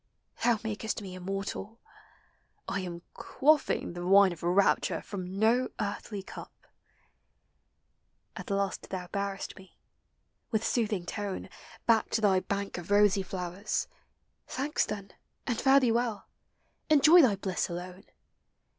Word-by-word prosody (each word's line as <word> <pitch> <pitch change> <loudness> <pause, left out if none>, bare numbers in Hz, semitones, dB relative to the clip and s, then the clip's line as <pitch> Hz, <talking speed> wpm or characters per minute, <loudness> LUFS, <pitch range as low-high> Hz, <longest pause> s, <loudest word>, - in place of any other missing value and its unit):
Thou 235 -1 +4
makest 220 0 -3
me 190 -2 -7
immortal! 195 +4 -5 0.9
I 195 - -1
am 175 -2 -6
quaffing 295 - +1
The 175 0 -6
wine 195 +1 +6
of 165 - -13
rapture 180 +3 +2
from 185 -1 -6
no 235 +4 +3
earthly 205 -1 -4
cup! - - -11 1.7
At - - -8
last 200 -1 -2
thou 180 -2 -5
bearest 200 -1 -3
me, 190 -1 -16 0.7
with 220 -1 0
soothing 210 -7 0
tone, 205 0 -4 0.4
Back 225 -2 +3
to - - -4
thy 195 -3 +4
bank 200 -1 -3
of 175 - -10
rosy 205 -1 +4
flowers: 185 +2 -3 0.6
Thanks, 285 +4 -1
then, 200 -2 -6 0.3
and 240 -4 -1
fare 270 +1 +6
thee 250 -4 +2
well! 230 -2 -1 0.6
Enjoy 310 +4 +8
thy 240 -9 +4
blis& 190 -1 -2
alone! 180 +2 -7
200 Hz, 130 wpm, -29 LUFS, 185-225 Hz, 1.7 s, Enjoy